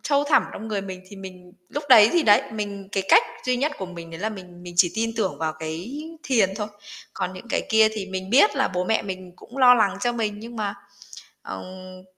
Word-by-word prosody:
sâu 285 -1 +2
thẳm 290 - +4
trong 220 - -7
người 210 -2 -1
mình 185 -1 -8
thì 200 - -12
mình 180 -2 -11 0.2
lúc 290 0 -5
đấy 225 -4 +9
thì 345 - +3
đấy, 205 -5 +5
mình 200 -2 -5
cái 195 - 0
cách - - +7 0.2
duy 250 -1 +2
nhất 295 +4 0
của 190 - -4
mình 170 -2 -10
đấy 165 +2 -9
là 220 - 0
mình 180 -4 -11
mình 175 -1 -9
chỉ 175 -1 +4
tin 225 +1 -1
tưởng 200 -4 -1
vào 160 -1 -1
cái 175 - -5 0.2
thiền 215 -8 +2
thôi. 210 - -3 0.5
Còn 180 - -3
những 185 +5 -11
cái - - 0
kia 220 0 +6
thì 205 -3 -5
mình 190 0 -5
biết 285 - +5
là 265 - +2
bố 180 0 -2
mẹ 220 +3 +1
mình 185 -2 -7
cũng 255 - -12
lo 250 -1 +8
lắng 205 -4 +2
cho 240 +2 +1
mình 220 -3 -2
nhưng 230 +1 -9
mà, 205 -2 -2 0.7
ừm 185 - -9
200 Hz, 235 wpm, -24 LUFS, 185-230 Hz, 0.7 s, đấy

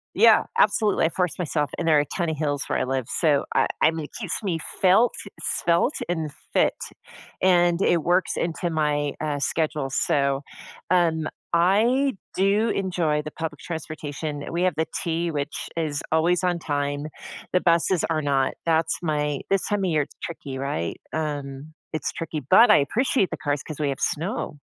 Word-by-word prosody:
Yeah, - - +6
absolutely, 215 - +3
I - - +2
force 180 0 -1
myself, 150 -5 -1
and 165 - -2
there 155 - +5
are - - +5
a - - -3
ton 175 -3 0
of 155 - -3
hills 145 -2 -1
where - - 0
I - - +1
live, 130 -1 -1
so, 150 -4 +1
I - - +3
I - - +5
mean, 160 -2 -4
it - - -14
keeps - - -3
me 185 -6 -1 0.2
felt, 200 +6 +5 0.3
svelte, 170 - +1
and 160 -4 -2 0.2
fit, - - +3 0.7
and 175 -2 +4
it 175 -3 +3
works 180 +3 +2
into 170 +1 -2
my, 150 -2 0
uh, 150 -2 -1
schedule, 150 -2 -1
so, 140 0 +1 0.5
um, 165 -3 +2 0.3
I 225 +11 +3 0.2
do 200 +4 +2
enjoy 175 -6 0
the 155 0 -7
public 160 -2 -5
transportation, 155 -2 -5
we 170 +2 0
have 185 -2 +2
the 160 - 0 0.2
T, 170 0 -1
which 145 -2 -4
is 155 -3 -1
always 170 +3 +2
on 180 -1 +1
time, 145 -2 -2 0.5
the 180 - +3
buses 170 0 +2
are 160 -1 +1
not, 140 -2 +1
that's 160 -1 +2
my 150 -3 -1
This 195 -1 +2
time 205 -1 0
of 185 - +1
year, 155 -2 +3
it's - - -15
tricky, 145 -5 -6
right, 130 - -3
um, 145 -1 -4 0.2
it's 155 - -2
tricky, 165 -1 -4
but 225 +4 +8
I - - +7
appreciate 205 - +1
the - - -4
cars 145 -1 -1
'cause 155 -2 -8
we 145 -2 0
have 135 - -3
snow, 160 -1 -2
160 Hz, 180 wpm, -24 LUFS, 145-175 Hz, 0.7 s, but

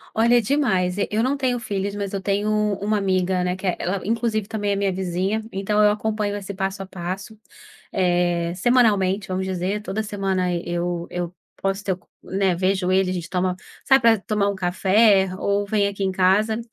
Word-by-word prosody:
Olha, 235 +2 +4
demais. 200 -8 +1
E - - 0
eu 220 +2 0
não 275 +2 +1
tenho 255 -3 0
filhas, 200 -3 -3
mas 200 -1 -3
eu 195 - -1
tenho 205 +2 0
u 210 -1 +1
uma 210 0 +1
amiga, 185 -2 +1
né, 180 0 0
que 190 - -8
é 180 - 0
ela, 185 +2 -2
inclusive, 225 -2 0
também 205 -2 -2
é - - 0
minha 200 -1 0
vizinha, 190 +3 -1
então 210 +2 +1
eu 210 - +6
acompanho 210 -1 -1
esse 200 0 -6
passo 195 0 -3
a - - -9
passo, 190 +4 -6 0.5
eh, 175 -2 +1
semanalmente, 205 -3 +2
vamos 185 +1 -1
dizer, 190 +3 -2
toda 215 +2 -3
semana 195 -3 -1
e 170 - -2
eu 175 0 -2
eu 175 0 -4 0.3
posso 195 +1 -1
ter 190 - 0
o - - -8
co 180 - -31
né, 190 -2 0
vejo 185 0 0
ele, 190 0 +3
a - - -1
gente 175 -1 -5
toma 180 0 0 0.3
sai 270 -1 +6
pra 230 -2 +5
tomar 205 -1 0
um 200 - -2
café 190 +2 +3
ou 200 0 0
vem 200 0 +1
aqui 200 0 -4
em 190 - +1
casa. 200 +4 +2
195 Hz, 210 wpm, -23 LUFS, 185-210 Hz, 0.5 s, eu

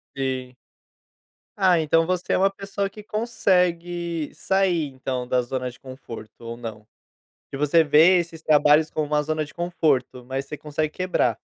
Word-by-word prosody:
Sim. 130 -2 -3 1.0
Ah, 185 -4 +4
então 165 +1 +3
você 180 0 -1
é - - +3
uma 195 +1 +3
pessoa 195 0 -4
que 210 +2 -11
consegue 175 -7 0
sair 185 -5 +1
então 130 -1 -4
da 125 0 +1
zona 125 0 -4
de - - -19
conforto? 130 -4 -10
Ou 115 0 -6
não? 110 -3 -8 0.6
Se 135 - -6
você 150 +3 +4
vê 160 +5 +6
esses 165 -1 -6
trabalhos 150 +1 +4
como 155 -1 -2
uma 150 0 +1
zona 155 0 -1
de 145 - -10
conforto, 155 -7 0
mas 135 +2 -4
você 150 - -6
consegue 150 +1 -3
quebrar? 185 0 0
155 Hz, 160 wpm, -24 LUFS, 135-175 Hz, 1.0 s, vê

